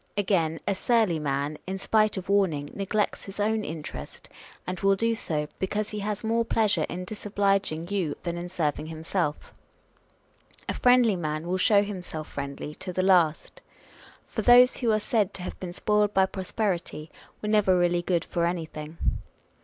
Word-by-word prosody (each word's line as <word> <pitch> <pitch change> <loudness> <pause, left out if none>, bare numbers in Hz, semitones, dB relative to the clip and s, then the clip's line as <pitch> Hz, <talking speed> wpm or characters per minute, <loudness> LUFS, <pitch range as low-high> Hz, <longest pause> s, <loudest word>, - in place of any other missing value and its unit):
Again, 175 -5 +1
a 200 - +3
surly 210 -4 +2
man, 145 +1 -2
in 190 +1 -3
spite 215 +1 +2
of 190 - -5
wrarning, 180 -8 +1
neglects 205 +1 -1
his 195 +1 -9
own 215 +1 +1
interest, 155 -2 -7 0.4
and 180 -1 -4
will 195 0 +3
do 230 +3 +1
so, 155 -9 -2
because 210 +2 -1
he 210 - -4
has 210 +1 -3
more 230 +1 +1
pleasure 220 -2 +1
in 180 +1 -5
dis 210 +3 -8
obliging 195 -5 +1
you 190 -7 -1
than 170 -1 -2
in 175 +1 -5
serving 155 -4 -1
himself. 160 0 -3 0.6
" - - -33
A - - -1
friendly 245 -4 +4
man 155 -1 -3
will 185 +1 0
show 205 +1 +4
himself 180 -6 -6
friendly 140 +1 -5
" - - -35
to 185 - -4
the 185 +1 0
last; 175 -5 +2 0.6
for - - -4
those 250 +1 +7
who 235 -3 +1
are 215 - +3
said 215 -2 0
to 180 - -6
have - - -6
been 180 -2 -5
spoiled 210 +3 +1
by 190 0 +5
prosperity 185 -5 -3 0.3
were 210 - -4
never 205 -4 +4
really 175 0 +2
good 175 -1 0
for 170 -1 0
anything. 160 -2 -5
190 Hz, 175 wpm, -27 LUFS, 165-210 Hz, 0.6 s, those